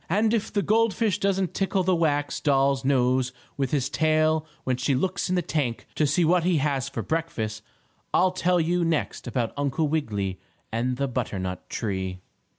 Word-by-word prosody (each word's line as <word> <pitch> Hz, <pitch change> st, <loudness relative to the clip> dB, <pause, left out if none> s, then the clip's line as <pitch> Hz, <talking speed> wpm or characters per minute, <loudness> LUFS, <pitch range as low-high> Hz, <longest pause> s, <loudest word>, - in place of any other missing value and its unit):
And 215 Hz, +5 st, +2 dB
if 225 Hz, -3 st, 0 dB
the 205 Hz, -, 0 dB
gold 225 Hz, -2 st, +3 dB
fish 210 Hz, -2 st, +1 dB
doesn't 195 Hz, -2 st, 0 dB
tickle 195 Hz, -1 st, 0 dB
the 185 Hz, 0 st, +3 dB
wax 145 Hz, -3 st, 0 dB
doll's 140 Hz, -2 st, +2 dB
nose 130 Hz, -1 st, +2 dB, 0.2 s
with 135 Hz, -2 st, -1 dB
his 135 Hz, -2 st, 0 dB
tail 155 Hz, 0 st, +2 dB, 0.2 s
when 130 Hz, -, 0 dB
she 130 Hz, +2 st, +1 dB
looks 185 Hz, +8 st, -1 dB
in 185 Hz, -, +1 dB
the 180 Hz, -, +1 dB
tank 140 Hz, -8 st, -2 dB
to 150 Hz, -, +2 dB
see 155 Hz, +5 st, +2 dB
what 175 Hz, +1 st, +3 dB
he 175 Hz, -1 st, +2 dB
has 140 Hz, -3 st, 0 dB
for 115 Hz, -, -4 dB
breakfast, 115 Hz, -10 st, -2 dB, 0.5 s
I'll 185 Hz, 0 st, +4 dB
tell 180 Hz, -1 st, +1 dB
you 170 Hz, +2 st, +1 dB
next 165 Hz, -5 st, -1 dB
about 120 Hz, -2 st, -1 dB
Uncle 145 Hz, +2 st, 0 dB
Wiggily 105 Hz, -11 st, -2 dB, 0.3 s
and 125 Hz, +3 st, -1 dB
the 140 Hz, +1 st, 0 dB
butternut 95 Hz, -8 st, -3 dB
tree. 95 Hz, -4 st, -3 dB
150 Hz, 180 wpm, -26 LUFS, 125-180 Hz, 0.5 s, I'll